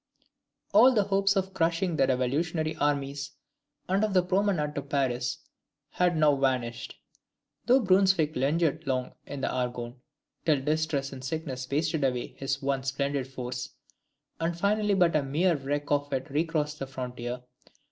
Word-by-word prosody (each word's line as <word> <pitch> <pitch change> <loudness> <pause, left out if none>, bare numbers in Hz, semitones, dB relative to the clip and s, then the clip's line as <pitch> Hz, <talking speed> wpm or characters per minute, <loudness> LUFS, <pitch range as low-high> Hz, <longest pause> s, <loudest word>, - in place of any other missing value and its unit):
All 235 +3 +7
hopes 200 0 +2
of 190 0 -1
crushing 170 0 +1
the 135 -3 +3
revolutionary 155 +5 0
armies, 140 -1 -1 0.5
and 195 +3 +1
of 210 -2 0
the 180 - +5
promenade 180 -5 +1
to 140 - -3
Paris, 130 -3 -1 0.5
had 175 -2 +1
now 150 -2 +5
vanished, 130 -4 -1 0.7
though 255 +2 +6
Brunswick 185 -6 +3
lingered 155 +3 +1
long 130 -1 -1
in 140 -1 -6
the - - 0
Argonne, 125 -1 -3 0.4
till 155 -4 +3
distress 150 -2 0
and 130 -1 -9
sickness 135 -3 -4
wasted 155 +1 0
away 125 -2 -1
his 135 0 -2
once 135 -1 -1
splendid 140 -1 -1
force, 125 -1 -6 0.6
and 165 +1 -1
finally 205 +2 +2
but 175 -4 +3
a 155 - +4
mere 160 +6 +1
wreck 145 +1 -3
of 145 0 +1
it 130 +1 -3
recrossed 150 0 -1
the 135 - -4
frontier. 125 -1 -5
145 Hz, 145 wpm, -28 LUFS, 135-170 Hz, 0.7 s, All